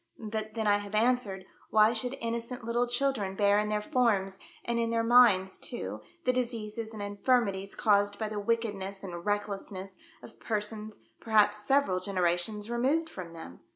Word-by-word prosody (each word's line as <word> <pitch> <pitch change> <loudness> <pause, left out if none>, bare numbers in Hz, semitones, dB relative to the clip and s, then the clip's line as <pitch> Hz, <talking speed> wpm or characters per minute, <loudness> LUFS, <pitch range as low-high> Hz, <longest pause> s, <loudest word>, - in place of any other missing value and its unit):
"But 215 0 -5
then 220 -1 -1
I 205 -1 +4
have 205 0 -6
answered, 215 -5 +1 0.2
why 215 +1 +5
should 245 +3 -2
innocent 235 +1 -4
little 235 +2 0
children 245 -6 0
bear 205 0 +4
in 210 0 -1
their 210 0 -1
forms, 210 -8 +1 0.3
and 235 0 0
in 230 0 0
their 230 0 +1
minds 230 -6 +5
too, 240 - -6 0.2
the 255 - +3
diseases 230 -3 -3
and 215 -2 -6
infirmities 205 -2 0
caused 205 -1 +2
by 220 - -2
the 210 -1 -4
wickedness 205 -3 -2
and 175 -3 -6
recklessness 200 -2 -3 0.2
of - - -13
per 215 -2 -1
sons, 215 0 -7 0.2
perhaps 210 -1 +3
several 270 -6 +2
generations 185 +3 -1
removed 290 +7 +1
from 175 -3 -8
them 160 - -10
215 Hz, 165 wpm, -30 LUFS, 200-235 Hz, 0.3 s, why